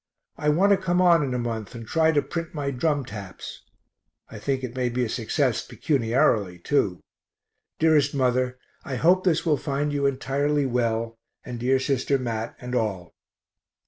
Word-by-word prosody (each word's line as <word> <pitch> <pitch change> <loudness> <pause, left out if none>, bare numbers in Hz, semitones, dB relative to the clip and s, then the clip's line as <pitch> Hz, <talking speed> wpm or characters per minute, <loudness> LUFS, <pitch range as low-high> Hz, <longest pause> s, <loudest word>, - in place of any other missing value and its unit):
I 150 0 0
want 185 +7 +4
to 200 - +6
come 180 -2 0
on 175 -3 +5
in 130 -3 -1
a - - 0
month 115 -3 -4
and 115 -1 -7
try 160 +5 +3
to 145 -2 +2
print 165 -1 -5
my 140 -2 -2
"Drum 145 +1 0
Taps." 100 -3 -8 0.7
I 110 - -8
think 130 +4 -2
it 125 -1 -5
may 125 -1 0
be 125 +1 0
a - - -3
success 125 +2 0
pecuniarily, 115 - +1
too. 90 -2 0 0.8
Dearest 150 -3 +3
mother, 125 -1 +1 0.3
I 135 - -4
hope 180 +7 +3
this 170 -4 +1
will 155 -3 +3
find 145 +1 -2
you 140 -1 +1
entirely 140 +2 0
well, 115 -2 -1 0.3
and 120 -1 -6
dear 130 +2 +2
sister 135 +1 +1
Mat 115 -3 -4
and 125 0 -7
all. 100 -7 -2
130 Hz, 175 wpm, -25 LUFS, 115-150 Hz, 0.8 s, to